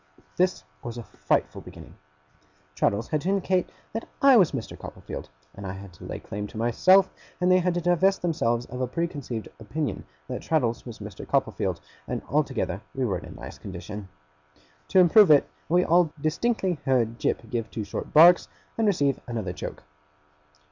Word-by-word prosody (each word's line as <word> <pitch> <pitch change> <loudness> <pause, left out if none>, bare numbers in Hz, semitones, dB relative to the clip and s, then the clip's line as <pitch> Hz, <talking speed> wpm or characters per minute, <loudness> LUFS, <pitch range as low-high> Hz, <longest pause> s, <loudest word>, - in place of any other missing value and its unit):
This 185 0 +1 0.2
was 120 0 -6
a 120 - -5
frightful - - -1
beginning. - - -12 0.8
Traddles 100 +8 0
had 155 - 0
to 180 - -2
indicate 190 -2 +1 0.2
that 225 - -4
I 275 -1 +7
was 190 -8 +5
Mr. 130 -6 -5
Copperfield, - - -8 0.2
and 100 - -10
I 95 -1 -4
had 95 -1 -10
to 90 - -13
lay - - -5
claim 105 +1 -6
to 110 - -11
myself, 185 - +4 0.3
and 180 +1 +3
they 185 - +6
had 180 -1 0
to 175 - 0
divest 175 +3 +2
themselves 120 -9 0
of 125 +1 -6
a 130 - 0
preconceived 140 -6 -4
opinion 135 +8 -3 0.2
that 125 -1 -4
Traddles 125 -8 0
was 115 - -8
Mr. 105 -2 -9
Copperfield, - - 0 0.3
and - - -3
altogether 95 +4 0
we 130 -1 0
were 95 -6 -1
in - - -11
a - - -11
nice - - -9
condition. 95 +2 -8 0.8
To - - 0
improve 185 +2 +7
it, 145 -2 +6 0.2
we 180 +2 +4
all 170 -1 +4
distinctly 180 +2 0
heard 120 -3 +1
Jip 115 - -1
give 115 -2 -2
two 110 - -4
short - - -6
barks, 170 +3 +7 0.3
and 225 - +3
receive 145 -9 +2
another 110 -7 -3
choke. - - -7
140 Hz, 175 wpm, -26 LUFS, 110-180 Hz, 0.8 s, I